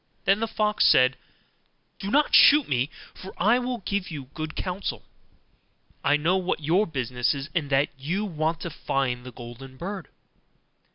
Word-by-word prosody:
Then 195 +1 +4
the 225 - -1
fox 215 -1 +2
said, 130 0 +5 0.8
'Do 195 - -4
not 290 +6 +2
shoot 295 -1 +7
me, 130 +1 0 0.2
for 190 - -11
I 220 +7 +3
will 245 -4 -4
give 200 -2 -2
you 140 -5 -8
good 155 -1 -5
counsel; 185 +2 -4 1.0
I 145 +1 +4
know 170 +5 +2
what 185 -3 -1
your 170 +8 +2
business 125 -3 -1
is, 140 +2 -6
and 155 -5 -1
that 135 +1 +2
you 180 +10 -2
want 165 -2 -2
to 170 - -5
find 125 -4 -2
the 125 - -9
golden 125 +2 -11
bird. 190 +2 -6
160 Hz, 165 wpm, -25 LUFS, 135-200 Hz, 1.0 s, shoot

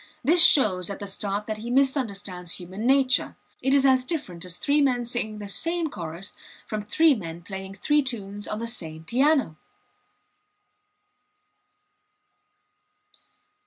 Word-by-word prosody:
This 330 +6 +7
shows 185 - +5
at 200 - -5
the 205 - -6
start 200 +1 -2
that 215 0 -4
he 235 +2 -6
misunderstands 210 - -1
human 190 +5 -5
nature. 265 -1 +3 0.3
It 265 - 0
is 275 0 +4
as 260 -1 +4
different 255 - -5
as 180 -1 -5
three 290 +1 +1
men 250 -3 +1
singing 230 -3 -2
the 205 -1 -7
same 330 +8 -2
chorus 170 +3 -6 0.3
from 215 -1 -4
three 315 +9 +3
men 170 -7 -7
playing 190 +1 -8
three 295 +9 +2
tunes 205 -6 -5
on 210 - -4
the 230 - -4
same 160 -9 -4
piano. 260 - +1
215 Hz, 135 wpm, -25 LUFS, 190-270 Hz, 0.3 s, This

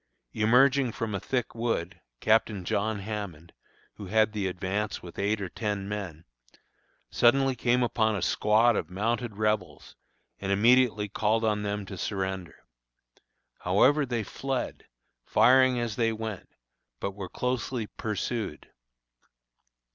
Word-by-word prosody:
Emerging 125 +4 +4
from 110 -1 -4
a 100 - -1
thick 125 +2 -2
wood, 115 -7 -2 0.2
Captain 110 -3 +2
John 105 +2 -1
Hammond, 95 -6 -6 0.4
who 100 - -8
had 110 +2 +2
the 100 -3 -1
advance 95 +3 -3
with 85 - -10
eight 105 +2 +1
or 95 - -3
ten 100 +1 -3
men, 95 -6 -5 0.9
suddenly 135 +2 +3
came 125 +1 +2
upon 110 -2 +1
a 100 - -3
squad 110 +5 +3
of - - -2
mounted 110 +3 -2
Rebels, 105 -9 -2 0.4
and 100 0 -3
immediately 115 +1 +4
called 110 +2 0
on 105 -1 +1
them 105 0 -3
to 95 -2 -8
surrender. 95 -3 -3 1.0
However, 130 +11 +3
they 120 -4 -2
fled, 135 +5 -4 0.4
firing 130 - +4
as 115 -3 -3
they 115 -1 +2
went, 110 -3 -6 0.5
but 100 - -2
were 95 -1 -7
closely 125 -2 -2
pursued. 110 +2 -4
110 Hz, 130 wpm, -28 LUFS, 100-120 Hz, 1.0 s, Emerging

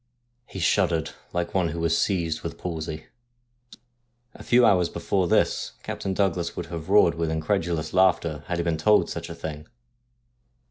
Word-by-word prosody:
He - - -9
shuddered 85 -2 +1 0.2
like 85 -1 -2
one 95 -3 +2
who 85 +1 -4
was 85 0 +1
seized 85 -5 0
with - - -6
palsy. 80 -2 -5 1.3
A - - -13
few 125 0 +4
hours 90 -5 +4
before 95 -3 -1
this - - +1
Captain 95 -1 -4
Douglas 90 -4 0
would 85 - -3
have 85 0 -7
roared 100 -4 +5
with 80 -1 -2
incredulous 80 -1 -1
laughter 90 -4 +2
had 90 - -2
he 85 - 0
been 85 -1 0
told 105 +7 +3
such - - -5
a - - -7
thing. 75 0 -7
85 Hz, 160 wpm, -25 LUFS, 80-95 Hz, 1.3 s, roared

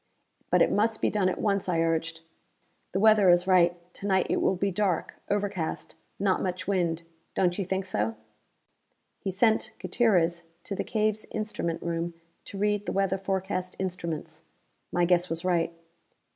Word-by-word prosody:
"But - - +5
it - - +1
must 220 +1 +2
be - - +1
done 195 -3 +2
at - - -3
once," 200 -3 0
I 170 -2 +1
urged. 165 0 0 0.7
"The 190 - 0
weather 215 -2 +6
is 175 0 +5
right; 175 -2 +4 0.2
to 200 - -6
night 190 -2 +3
it - - +1
will 190 - +2
be 195 +2 0
dark; 190 -3 0 0.2
overcast; 200 -5 -2 0.2
not 195 -1 +1
much 180 -2 -3
wind. 170 -4 0 0.3
Don't 180 +1 +1
you 195 - -1
think 190 +1 -1
so?" 110 - -1 1.0
He - - -3
sent 220 +3 +2
Gutierrez 180 -4 +2 0.2
to - - -5
the - - -2
cave's 215 -1 0
instrument 210 -6 -3
room 170 0 -2 0.3
to 200 - -8
read 205 0 0
the - - 0
weather 195 0 +1
forecast 190 -1 -2
instruments. 170 -4 -4 0.5
My 175 0 +2
guess 180 0 +2
was 165 +2 -3
right. 170 -2 +2
185 Hz, 165 wpm, -28 LUFS, 170-200 Hz, 1.0 s, weather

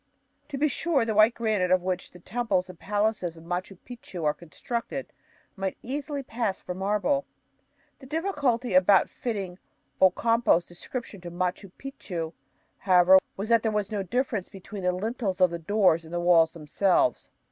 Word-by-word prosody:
To 275 - -4
be 300 +3 +3
sure, 290 -2 +1
the 225 - -1
white 215 +3 +5
granite 215 -5 0
of 185 -1 +3
which 185 -1 -2
the - - -15
temples 190 -1 -1
and 175 - -19
palaces 205 -4 -1
of 165 - -13
Machu 180 +2 -4
Picchu 230 -8 -8
are 150 - +3
constructed 235 - -5 0.4
might 195 -1 -3
easily 280 +2 -4
pass 230 -5 -2
for 180 - -6
marble. 210 +9 0 0.8
The 265 - -13
difficulty 285 - -1
about 185 +1 +5
fitting 195 -6 -4 0.4
Ocampo's 190 -1 +4
description 200 +3 -7
to 175 - -7
Machu 180 +2 -3
Picchu, 175 -12 -6 0.5
however, 185 0 +6 0.2
was 200 +3 -4
that 230 -1 +5
there 220 - 0
was 210 -1 -1
no 205 -2 -1
difference 225 -1 -2
between 195 +1 -9
the 180 0 +2
lintels 200 0 -3
of 185 -2 +5
the 170 - -4
doors 175 -2 +3
and 160 - -13
the - - 0
walls 170 -2 +4
themselves. 190 - +1
200 Hz, 165 wpm, -27 LUFS, 180-235 Hz, 0.8 s, however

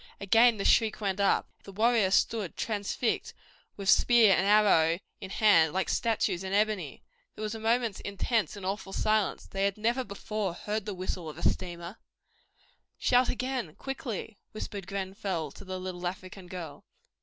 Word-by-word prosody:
Again 225 +4 +5
the 195 - -3
shriek 220 -2 +3
went 200 -2 -2
up. 200 - +2 0.2
The 195 - -10
warriors 215 -2 +3
stood 215 -6 0
transfixed 215 +2 -2 0.4
with 200 -1 -6
spear 225 0 +6
and 190 - +1
arrow 195 -6 +5 0.2
in 190 - -7
hand 180 -7 +4
like 190 +1 -1
statues 220 -5 0
in 190 0 -4
ebony. 205 -8 0 0.3
There 215 - -6
was 215 0 -2
a 225 - -6
moment's 230 -1 0
intense 210 +3 -1
and 200 -2 -8
awful 195 0 -4
silence. 215 -1 0
They 195 0 -3
had 200 0 0
never 235 +4 0
before 200 -3 -4
heard 210 +2 -4
the 205 - -3
whistle 180 -2 -4
of 150 - -10
a - - +1
steamer! 175 +2 -3 1.0
"Shout 250 0 +3
again 255 - -3
quickly," 250 - -6
whispered 205 -3 -6
Grenfell 190 -5 -3
to - - -12
the 185 -1 -5
little 180 -1 -4
African 185 +1 -7
girl. 175 -6 -8
200 Hz, 165 wpm, -29 LUFS, 185-220 Hz, 1.0 s, spear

